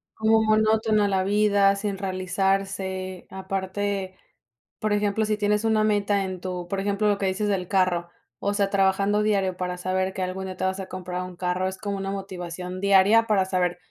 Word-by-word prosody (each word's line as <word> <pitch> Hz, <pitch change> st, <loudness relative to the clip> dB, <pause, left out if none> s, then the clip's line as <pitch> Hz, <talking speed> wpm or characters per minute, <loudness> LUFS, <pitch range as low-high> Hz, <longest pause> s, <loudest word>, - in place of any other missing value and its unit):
Como 220 Hz, 0 st, +3 dB
monótona 215 Hz, -1 st, +3 dB
la 190 Hz, -1 st, +1 dB
vida, 200 Hz, 0 st, +3 dB
sin 200 Hz, -1 st, -3 dB
realizarse. 190 Hz, 0 st, -2 dB
Aparte, 190 Hz, 0 st, -3 dB, 0.6 s
por 215 Hz, -, -1 dB
ejemplo, 205 Hz, +1 st, +1 dB
si 215 Hz, 0 st, 0 dB
tienes 210 Hz, +1 st, +1 dB
una 220 Hz, -1 st, +3 dB
meta 205 Hz, -1 st, +1 dB
en 185 Hz, -1 st, -6 dB
tu 180 Hz, -1 st, -5 dB
por 195 Hz, +2 st, -2 dB
ejemplo, 200 Hz, +1 st, 0 dB
lo 205 Hz, -, +2 dB
que 195 Hz, -, 0 dB
dices 195 Hz, +3 st, -1 dB
del 185 Hz, -3 st, -1 dB
carro, 180 Hz, -3 st, +1 dB, 0.3 s
o 200 Hz, -, -1 dB
sea, 200 Hz, -1 st, +1 dB
trabajando 195 Hz, +1 st, +2 dB
diario 195 Hz, -3 st, +1 dB
para 180 Hz, 0 st, -3 dB
saber 185 Hz, +1 st, -1 dB
que 190 Hz, -, -3 dB
algún 190 Hz, +1 st, -4 dB
día 185 Hz, -1 st, -6 dB
te -, -, -4 dB
vas 190 Hz, +1 st, -1 dB
a 190 Hz, -, -5 dB
comprar 180 Hz, -1 st, -5 dB
un 180 Hz, -1 st, -8 dB
carro, 180 Hz, +1 st, -1 dB
es 190 Hz, 0 st, -5 dB
como 200 Hz, 0 st, -4 dB
una 195 Hz, 0 st, -3 dB
motivación 185 Hz, -1 st, -6 dB
diaria 200 Hz, +3 st, +5 dB
para 200 Hz, -4 st, +3 dB
saber, 180 Hz, -2 st, 0 dB
195 Hz, 190 wpm, -25 LUFS, 185-205 Hz, 0.6 s, diaria